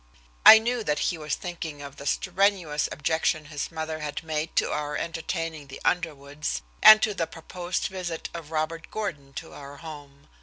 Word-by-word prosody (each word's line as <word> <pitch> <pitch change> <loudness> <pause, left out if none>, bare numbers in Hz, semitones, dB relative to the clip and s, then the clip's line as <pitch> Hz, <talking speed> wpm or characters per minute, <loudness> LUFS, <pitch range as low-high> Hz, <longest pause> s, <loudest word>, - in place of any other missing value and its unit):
I 220 - +13
knew 235 +1 -1
that 150 -6 0
he 170 - -1
was 150 -1 -2
thinking 165 -4 -6
of 140 0 -10
the 140 - -7
strenuous 185 -5 +1
objection 155 0 0
his 150 +1 -5
mother 160 -1 -4
had 150 +1 -4
made 155 0 -3
to - - +2
our 150 0 -2
entertaining 165 -2 -4
the 135 - -9
Underwoods, 150 - -1 0.2
and 215 0 +11
to 215 - +2
the 170 -4 -2
proposed 175 +2 -4
visit 180 -4 -4
of 165 -3 -7
Robert 160 +1 -3
Gordon 165 -11 -5
to - - -8
our 140 0 -10
home. 145 -3 -11
160 Hz, 175 wpm, -26 LUFS, 150-175 Hz, 0.2 s, I